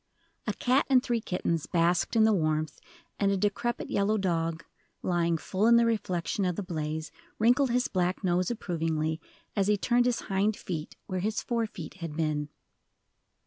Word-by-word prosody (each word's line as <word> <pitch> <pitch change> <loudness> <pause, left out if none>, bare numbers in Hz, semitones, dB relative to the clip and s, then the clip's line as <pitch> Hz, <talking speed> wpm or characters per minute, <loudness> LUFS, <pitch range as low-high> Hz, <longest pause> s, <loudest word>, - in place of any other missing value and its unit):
A - - +1
cat 255 +3 +2
and 260 -2 +5
three 240 -3 0
kittens 170 -5 -1
basked 170 +5 +2
in 225 - +6
the 220 0 +5
warmth, 155 -4 0 0.4
and 200 -1 +3
a 195 - +1
decrepit 210 +4 -1
yellow 205 +2 +2
dog, 165 -3 -1 0.4
lying 170 -2 +1
full 190 +6 0
in 235 - +7
the 235 0 +5
reflection 200 -4 -1
of 180 -2 0
the 205 - -3
blaze, 155 -3 -4 0.3
wrinkled 250 +5 +4
his 245 +1 +1
black 180 +1 -1
nose 180 0 +1
approvingly, 160 -7 -1 0.3
as 200 -2 +2
he 210 0 +3
turned 245 +4 +2
his 245 - 0
hind 200 +2 0
feet 160 -4 -5
where 185 -1 -3
his 215 +4 -1
fore 230 -2 0
feet 175 -8 -8
had 165 -4 -6
been. 150 -2 -1
185 Hz, 175 wpm, -29 LUFS, 165-220 Hz, 0.4 s, in